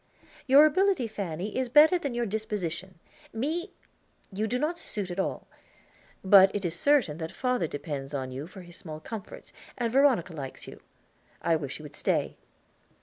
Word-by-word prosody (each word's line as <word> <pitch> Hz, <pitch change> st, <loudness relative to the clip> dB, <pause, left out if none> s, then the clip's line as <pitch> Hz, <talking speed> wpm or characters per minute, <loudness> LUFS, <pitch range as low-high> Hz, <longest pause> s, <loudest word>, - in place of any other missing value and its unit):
"Your 280 Hz, +3 st, +8 dB
ability, 370 Hz, -2 st, +2 dB
Fanny, 200 Hz, -2 st, -5 dB
is 260 Hz, -1 st, -1 dB
better 310 Hz, +7 st, +6 dB
than 280 Hz, -7 st, -4 dB
your 240 Hz, 0 st, 0 dB
disposition. 195 Hz, -4 st, -4 dB, 0.4 s
Me, 315 Hz, -, -2 dB, 0.6 s
you 215 Hz, +3 st, -1 dB
do 245 Hz, -, -1 dB
not 315 Hz, +6 st, -1 dB
suit 200 Hz, -, -4 dB
at 175 Hz, -, -5 dB
all; -, -, -2 dB, 0.8 s
but 195 Hz, 0 st, +8 dB
it 200 Hz, -2 st, -2 dB
is 165 Hz, -, -1 dB
certain 195 Hz, -, +2 dB
that 160 Hz, -1 st, -4 dB
father 250 Hz, -9 st, 0 dB
depends 145 Hz, -2 st, -5 dB
on 130 Hz, -3 st, -4 dB
you 135 Hz, +4 st, -6 dB
for 190 Hz, +1 st, -11 dB
his 175 Hz, -1 st, -13 dB
small 155 Hz, -4 st, -8 dB
comforts, 210 Hz, +5 st, -9 dB, 0.2 s
and 235 Hz, -2 st, -1 dB
Veronica 260 Hz, -, +3 dB
likes 135 Hz, -4 st, -7 dB
you. -, -, -11 dB, 0.6 s
I 165 Hz, -, +3 dB
wish 140 Hz, -4 st, -4 dB
you 155 Hz, -, -12 dB
would 150 Hz, -, -10 dB
stay." -, -, -1 dB
200 Hz, 170 wpm, -28 LUFS, 165-255 Hz, 0.8 s, Your